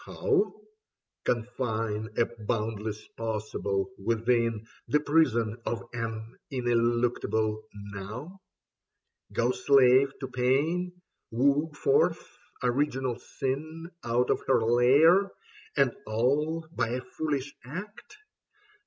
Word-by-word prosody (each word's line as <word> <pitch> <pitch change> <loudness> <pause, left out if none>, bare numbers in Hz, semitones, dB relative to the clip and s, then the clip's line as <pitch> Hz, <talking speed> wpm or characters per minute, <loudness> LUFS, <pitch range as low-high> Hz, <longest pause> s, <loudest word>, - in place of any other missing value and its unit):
How? 420 -3 0 0.7
Confine 110 -3 -1
a 120 - +4
boundless 110 -1 -3
possible 105 -3 -2
within 115 0 +1 0.2
The 150 - +3
prison 120 -7 +2
of 120 - -3
an 115 -1 -5
ineluctable 120 -3 +1
Now? 105 - -8 0.9
Go 120 +1 +2
slave 135 0 +5
to 135 - -4
pain, 155 +9 0 0.3
woo 140 +6 +2
forth 430 - +2 0.4
original 130 -1 0
sin 155 +5 -4
Out 120 +1 +1
of - - +1
her 130 -4 +4
lair 140 - +5 0.2
— - - -21
and 135 -3 +4 0.2
all 150 +9 +1
by - - 0
a 125 +2 -2
foolish 145 -1 -3
Act 205 - -8
125 Hz, 100 wpm, -28 LUFS, 115-145 Hz, 0.9 s, slave